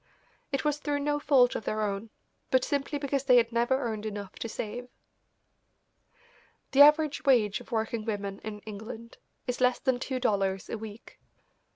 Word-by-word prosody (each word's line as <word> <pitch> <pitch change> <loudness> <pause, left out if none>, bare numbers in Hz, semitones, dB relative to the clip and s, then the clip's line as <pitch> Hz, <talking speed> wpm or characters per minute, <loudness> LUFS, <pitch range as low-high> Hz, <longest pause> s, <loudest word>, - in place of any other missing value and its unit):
It 275 +1 -1
was 295 -1 +1
through 290 -1 -1
no 295 0 0
fault 270 -4 +4
of - - -4
their 215 0 -1
own, 205 +2 -3 0.4
but 260 -1 +3
simply 285 +1 -1
because 275 -1 -2
they 250 -2 +6
had 230 -1 +3
never 240 +3 +2
earned 220 -5 -3
enough 205 -3 -5
to 230 - -4
save. 235 +3 -5 1.8
The 275 - +6
average 300 0 +6
wage 220 -7 +3
of - - -16
working 225 0 -1
women 200 -3 -4
in 210 -1 -6
England 220 +2 -9 0.3
is 250 0 -3
less 250 0 +4
than 260 -2 0
two 260 0 -3
dollars 195 -5 0
a - - -2
week. 220 0 -10
240 Hz, 170 wpm, -29 LUFS, 215-275 Hz, 1.8 s, they